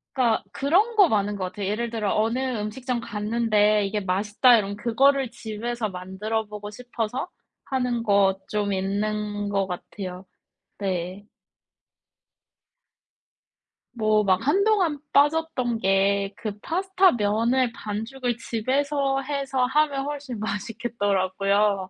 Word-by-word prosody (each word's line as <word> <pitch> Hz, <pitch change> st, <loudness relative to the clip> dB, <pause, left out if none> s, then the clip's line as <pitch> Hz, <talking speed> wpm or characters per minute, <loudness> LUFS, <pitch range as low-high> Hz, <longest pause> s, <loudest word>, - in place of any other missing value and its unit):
그러니까 240 Hz, -4 st, +2 dB
그런 380 Hz, +12 st, +2 dB
거 400 Hz, -6 st, +6 dB
많은 205 Hz, -1 st, +1 dB
것 190 Hz, -2 st, -3 dB
같아요 190 Hz, +2 st, -4 dB
예를 230 Hz, +4 st, -1 dB
들어 215 Hz, -4 st, -1 dB
어느 225 Hz, +4 st, +1 dB, 0.2 s
음식점 240 Hz, +3 st, -3 dB
갔는데 210 Hz, -1 st, +1 dB
이게 205 Hz, +2 st, -1 dB
맛있다 210 Hz, +6 st, +4 dB
이러면 200 Hz, -1 st, -2 dB
그거를 265 Hz, +4 st, +3 dB
집에서 225 Hz, +1 st, -4 dB
만들어보고 210 Hz, +3 st, -4 dB
싶어서 245 Hz, -, -4 dB, 0.4 s
하는 250 Hz, -3 st, -1 dB
거 200 Hz, -3 st, +3 dB
쫌 205 Hz, -1 st, -1 dB
있는 205 Hz, +1 st, -2 dB
것 195 Hz, -1 st, 0 dB
같아요. 185 Hz, 0 st, -7 dB, 0.5 s
네. 190 Hz, +1 st, -3 dB, 2.7 s
뭐 215 Hz, -2 st, +2 dB
막 190 Hz, +2 st, +2 dB
한동안 370 Hz, -2 st, +2 dB
빠졌던 285 Hz, -5 st, +2 dB
게 195 Hz, 0 st, +2 dB
그 210 Hz, -2 st, -5 dB
파스타 380 Hz, -, +2 dB
면을 230 Hz, +4 st, +1 dB
반죽을 235 Hz, +4 st, -3 dB
집에서 270 Hz, +4 st, 0 dB
해서 275 Hz, -2 st, -1 dB
하면 280 Hz, 0 st, +1 dB
훨씬 280 Hz, -5 st, -5 dB
맛있겠더라고요. 200 Hz, -2 st, 0 dB
220 Hz, 250 characters per minute, -25 LUFS, 205-260 Hz, 2.7 s, 거